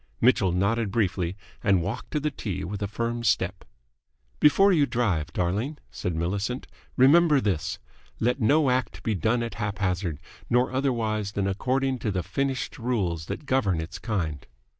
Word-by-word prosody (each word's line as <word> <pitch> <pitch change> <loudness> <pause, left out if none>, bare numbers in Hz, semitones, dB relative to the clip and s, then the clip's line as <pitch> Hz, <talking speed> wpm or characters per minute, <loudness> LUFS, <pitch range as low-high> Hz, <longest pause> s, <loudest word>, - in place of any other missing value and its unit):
Mitchell 110 -6 +4
nodded 100 +5 +1
briefly, 95 -3 0 0.3
and 95 -4 +3
walked 115 +7 -4
to 150 - -1
the 150 +1 -1
tee 95 -8 -4
with 100 +3 -5
a 100 - 0
firm 115 +3 -2
step. 95 -4 +1 0.8
"Before 195 +7 +6
you 145 -5 +3
drive, 95 - 0
darling," 105 - -1
said 90 - -3
Millicent, 100 +9 -2 0.3
"remember 150 +3 +6
this. 95 -10 -1 0.4
Let 125 +3 +1
no 140 +4 +4
act 125 0 -1
be 110 - 0
done 110 +6 +1
at 115 - -4
haphazard, 95 -6 -1 0.3
nor 125 +1 +3
otherwise 115 -6 -1
than 100 -1 0
according 130 +6 0
to 110 - -2
the 95 -3 -1
finished 135 +9 -2
rules 95 -10 -1
that - - -5
govern 120 -11 +1
its 85 +2 -6
kind." 85 - -3
110 Hz, 160 wpm, -26 LUFS, 95-125 Hz, 0.8 s, Before